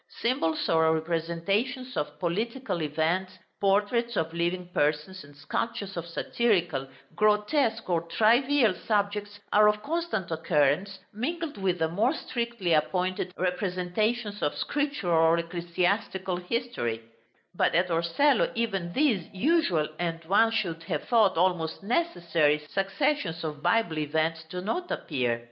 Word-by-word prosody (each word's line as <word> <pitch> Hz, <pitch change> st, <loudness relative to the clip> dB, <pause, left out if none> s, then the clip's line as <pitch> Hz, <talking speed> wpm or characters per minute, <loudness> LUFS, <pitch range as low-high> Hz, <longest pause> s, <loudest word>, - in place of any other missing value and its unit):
Symbols 230 Hz, -10 st, 0 dB
or 160 Hz, 0 st, +3 dB
representations 175 Hz, -, -2 dB
of 150 Hz, 0 st, -3 dB
political 205 Hz, -, -2 dB
events, 165 Hz, +5 st, -1 dB, 0.2 s
portraits 210 Hz, +4 st, +1 dB
of 160 Hz, 0 st, -1 dB
living 175 Hz, +1 st, -1 dB
persons, 150 Hz, +6 st, 0 dB
and 145 Hz, 0 st, -16 dB
sculptures 200 Hz, +6 st, -3 dB
of 170 Hz, -1 st, -5 dB
satirical, 175 Hz, -, 0 dB, 0.3 s
grotesque, 220 Hz, +3 st, +2 dB
or 170 Hz, -3 st, +1 dB
trivial 235 Hz, +4 st, +3 dB
subjects 205 Hz, +1 st, -2 dB
are 210 Hz, 0 st, +7 dB
of 210 Hz, 0 st, -1 dB
constant 315 Hz, -, -2 dB
occurrence, 160 Hz, +3 st, +1 dB, 0.2 s
mingled 310 Hz, +8 st, -3 dB
with 190 Hz, -3 st, 0 dB
the 160 Hz, -1 st, +1 dB
more 220 Hz, -, +1 dB
strictly 235 Hz, -, -2 dB
appointed 180 Hz, +3 st, 0 dB
representations 195 Hz, +4 st, -1 dB
of 145 Hz, -, 0 dB
scriptural 290 Hz, -11 st, -1 dB
or 165 Hz, +1 st, +5 dB
ecclesiastical 180 Hz, +3 st, -1 dB
history; 180 Hz, -, -3 dB, 0.5 s
but -, -, +1 dB
at 180 Hz, +2 st, +3 dB
Torcello 170 Hz, -, +2 dB
even 195 Hz, -7 st, -2 dB
these 250 Hz, -, +2 dB
usual, 195 Hz, -, +2 dB
and 165 Hz, -1 st, -3 dB
one 205 Hz, +6 st, +4 dB
should 190 Hz, -8 st, -2 dB
have 155 Hz, -6 st, -2 dB
thought 220 Hz, -7 st, +3 dB
almost 175 Hz, -1 st, 0 dB
necessary, 170 Hz, -, +1 dB
successions 195 Hz, -, -1 dB
of 150 Hz, -2 st, -5 dB
Bible 175 Hz, -2 st, +1 dB
events 160 Hz, +2 st, -1 dB
do 180 Hz, +1 st, -5 dB
not 350 Hz, -, -3 dB
appear. 125 Hz, -6 st, -1 dB
185 Hz, 125 wpm, -27 LUFS, 165-225 Hz, 0.5 s, are